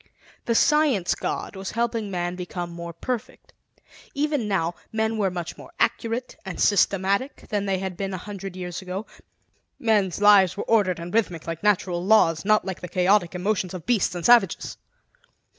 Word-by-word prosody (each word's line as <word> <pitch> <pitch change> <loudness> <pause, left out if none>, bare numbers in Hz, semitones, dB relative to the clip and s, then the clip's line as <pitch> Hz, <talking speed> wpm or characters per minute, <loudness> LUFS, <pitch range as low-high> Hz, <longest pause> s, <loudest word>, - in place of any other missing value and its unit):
The 230 - +1
Science 295 - +3
God - - -4
was 190 0 -5
helping 230 -2 -1
man 175 -2 -2
become 175 -1 -5
more 170 0 -7
perfect. 230 +7 -6 0.6
Even 290 -5 0
now, 175 -4 0 0.2
men 220 0 0
were 195 -2 +2
much 175 -2 -6
more - - -12
accurate 235 +2 -1
and 190 -3 -7
systematic 200 +5 +1
than 205 -1 -1
they 190 -1 +1
had 185 -1 -5
been 195 -1 -3
a 190 - -3
hundred 195 -1 -7
years 180 -1 -5
ago; 190 +3 -5 0.7
men's 205 -6 +1
lives 200 -3 +6
were - - -2
ordered 200 -6 +2
and 170 +1 -7
rhythmic, 180 -8 0
like 165 -1 -5
natural 185 -4 +1
laws, 180 -6 +4
not 215 -1 +3
like 190 -2 -5
the 180 - -5
chaotic 180 0 +2
emotions 185 0 -1
of 175 - -8
beasts 225 -7 +1
and 175 - -4
savages. 235 -7 +4
195 Hz, 170 wpm, -24 LUFS, 180-220 Hz, 0.7 s, lives